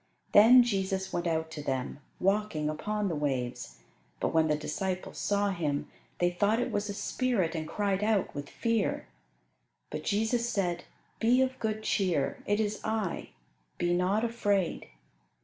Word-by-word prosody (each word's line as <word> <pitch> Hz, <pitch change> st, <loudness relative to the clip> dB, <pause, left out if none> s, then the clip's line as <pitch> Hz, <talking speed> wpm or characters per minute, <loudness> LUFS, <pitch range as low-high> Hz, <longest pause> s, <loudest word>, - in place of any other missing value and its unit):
Then 240 Hz, +4 st, +8 dB
Jesus 190 Hz, -4 st, -1 dB
went 175 Hz, 0 st, -1 dB
out 160 Hz, -1 st, -1 dB
to 155 Hz, -, -6 dB
them, 130 Hz, -1 st, -3 dB, 0.2 s
walking 195 Hz, -6 st, +1 dB
upon 210 Hz, +6 st, -2 dB
the 175 Hz, -, -1 dB
waves; 130 Hz, -5 st, -3 dB, 0.4 s
but -, -, +1 dB
when 160 Hz, -1 st, +4 dB
the 150 Hz, -, +2 dB
disciples 185 Hz, +5 st, -3 dB
saw 205 Hz, 0 st, +1 dB
Him 150 Hz, -6 st, -2 dB, 0.3 s
they 175 Hz, 0 st, +2 dB
thought 205 Hz, +5 st, +2 dB
it 245 Hz, -, -1 dB
was 205 Hz, 0 st, -1 dB
a -, -, -2 dB
spirit, 210 Hz, -5 st, 0 dB
and 160 Hz, -2 st, -3 dB
cried 200 Hz, +1 st, 0 dB
out 210 Hz, -3 st, +1 dB
with 145 Hz, -1 st, -6 dB
fear. 230 Hz, -1 st, 0 dB, 0.9 s
But -, -, -4 dB
Jesus 225 Hz, +3 st, +1 dB
said, 180 Hz, -6 st, -1 dB, 0.3 s
"Be 240 Hz, +3 st, +4 dB
of 260 Hz, 0 st, -3 dB
good 215 Hz, -1 st, -2 dB
cheer: 180 Hz, -11 st, 0 dB
it 205 Hz, +1 st, +2 dB
is 215 Hz, -1 st, -1 dB
I; 220 Hz, -5 st, -2 dB, 0.5 s
be 175 Hz, 0 st, +1 dB
not 185 Hz, +5 st, +1 dB
afraid." 205 Hz, -6 st, 0 dB
195 Hz, 155 wpm, -30 LUFS, 165-215 Hz, 0.9 s, Then